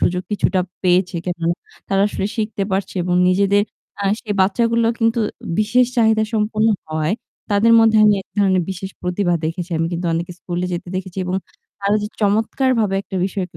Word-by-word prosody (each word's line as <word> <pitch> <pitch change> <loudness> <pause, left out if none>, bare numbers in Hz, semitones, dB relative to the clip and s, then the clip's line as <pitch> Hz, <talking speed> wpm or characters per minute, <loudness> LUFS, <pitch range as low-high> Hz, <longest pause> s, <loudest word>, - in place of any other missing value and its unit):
সুযোগ 180 +1 +1
কিছুটা 195 -2 +1 0.2
পেয়েছে। 180 0 +2
কেন 175 -1 -3 0.5
তারা 195 0 +2
আসলে 195 - -2
শিখতে 215 -2 -2
পারছে 190 +1 -1
এবং 175 0 0
নিজেদের 200 +2 +3 0.4
অ্যা 200 - -1
সেই 210 -2 -3
বাচ্চাগুলো 230 +4 +2
কিন্তু 230 +1 +2 0.4
বিশেষ 230 +4 +3
চাহিদা 220 -2 +4
সম্পন্ন 215 +1 +1 0.2
হওয়ায় 155 +3 -1 0.4
তাদের 210 +3 +4
মধ্যে 225 -1 +4
আমি 210 -1 +6
এক - - -58
ধরনের 190 -2 +3
বিশেষ 190 +1 -5
প্রতিভা 180 0 0
দেখেছি। 170 +3 -3
আমি 165 - +1
কিন্তু 175 +1 -2
অনেকে 170 +2 -2
স্কুলে 175 0 -3
যেতে 175 +1 -4
দেখেছি 185 0 -5
এবং 180 0 -2 0.5
তারা 200 +1 +2
যে - - -2
চমৎকারভাবে 220 +1 +1
একটা 195 - -6
বিষয়কে 185 -3 -4
195 Hz, 170 wpm, -20 LUFS, 180-215 Hz, 0.5 s, আমি